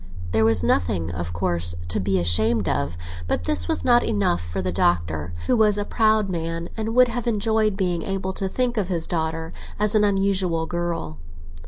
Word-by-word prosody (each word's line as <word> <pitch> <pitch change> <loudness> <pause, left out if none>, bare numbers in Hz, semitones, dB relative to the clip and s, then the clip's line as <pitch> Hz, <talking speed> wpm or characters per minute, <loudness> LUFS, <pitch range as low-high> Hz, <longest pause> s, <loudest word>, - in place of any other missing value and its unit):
There 110 +3 +2
was 110 -6 +4
nothing, 85 0 0
of 85 -1 -4
course, 85 0 0
to - - 0
be 95 0 0
ashamed 100 +4 +3
of; 70 +3 -1 0.3
but 85 - -1
this 85 -2 +3
was - - 0
not 240 -1 +5
enough 95 -4 0
for 85 +3 -5
the 90 -1 -2
Doctor, 85 -3 0
who - - +2
was 215 -3 +3
a 205 - -1
proud 215 -2 +2
man 165 -1 -4
and 225 +1 -3
would 250 -1 +5
have 240 0 -4
enjoyed 215 -2 +1
being 180 -3 -1
able 190 0 -3
to 190 0 -2
think 250 +2 -1
of 200 -4 0
his 170 -3 -2
daughter 160 -1 -3 0.2
as 210 +1 +1
an 215 -1 +3
unusual 195 -4 +1
girl. 170 - -4
165 Hz, 190 wpm, -23 LUFS, -, 0.3 s, not